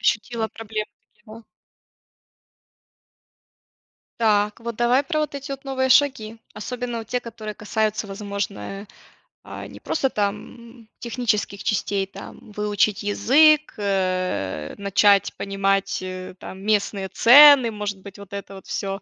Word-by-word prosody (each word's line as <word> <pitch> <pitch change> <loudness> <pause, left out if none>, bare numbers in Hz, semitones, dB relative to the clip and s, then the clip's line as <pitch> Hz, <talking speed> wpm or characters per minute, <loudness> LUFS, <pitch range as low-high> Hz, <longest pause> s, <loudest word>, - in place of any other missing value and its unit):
Ощутила 225 0 0
проблемы 220 -1 -5 0.2
такие, 210 - -34
да? 220 +1 -12 2.8
Так, 210 -1 +2
вот, 235 -1 -5
давай 240 +4 +2
про 305 0 0
эти 280 0 -7
вот 275 0 -6
новые 260 -1 -1
шаги. 245 -5 +2 0.2
Особенно, 245 +2 -5
вот, 225 - -9
те, 250 +2 -1
которые 220 -3 -8
касаются, 215 0 -2
возможно, 200 - -5 0.6
а, - - -8
не - - -12
просто 270 -4 -1
там, 225 +2 -5
технических 220 -4 -2
частей, 200 -2 -1
там, - - -11
выучить 210 -1 0
язык, 300 +9 +4
э, 185 - -2
начать 200 0 +3
понимать, 195 0 -1
э, 185 0 -7
там, 190 +1 -9
местные 200 -2 0
цены, 280 +1 +8
может 205 -2 -5
быть, 200 +1 -12
вот 200 -1 -13
это 200 0 -7
вот 190 - -12
всё. 195 0 -4
210 Hz, 125 wpm, -23 LUFS, 200-235 Hz, 2.8 s, цены